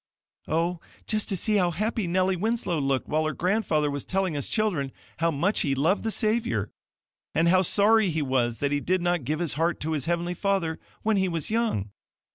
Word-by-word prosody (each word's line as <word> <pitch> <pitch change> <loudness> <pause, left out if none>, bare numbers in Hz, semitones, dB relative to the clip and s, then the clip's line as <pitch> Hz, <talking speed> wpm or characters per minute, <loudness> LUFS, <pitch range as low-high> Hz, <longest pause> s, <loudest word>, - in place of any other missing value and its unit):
"Oh, 170 +2 0 0.3
just 215 0 -1
to 195 - -1
see 210 +4 +1
how 180 -3 +3
happy 215 +3 -1
Nellie 185 +2 +2
Winslow 210 -3 -1
looked 135 -2 0
while 155 +1 +1
her 155 - -2
grandfather 170 -6 +1
was 140 -1 -3
telling 190 -4 -1
us 145 - -2
children 180 -12 0 0.3
how 165 +1 +2
much 170 +7 0
he 140 -3 +1
loved 160 +9 +2
the 225 - -2
Savior, 225 +2 0 0.6
and 165 +1 +3
how 185 +1 +5
sorry 205 +2 +4
he 160 -2 -1
was 125 -3 0
that 140 0 -1
he 145 - +1
did 180 +4 0
not 175 -6 0
give 155 +4 -1
his 170 -2 0
heart 165 +4 0
to 160 - -2
his 145 -4 -1
heavenly 175 +1 -1
Father 180 -3 -1 0.2
when 220 -1 +2
he 190 -1 +1
was 165 +2 -2
young. 220 - 0
175 Hz, 205 wpm, -26 LUFS, 150-200 Hz, 0.6 s, how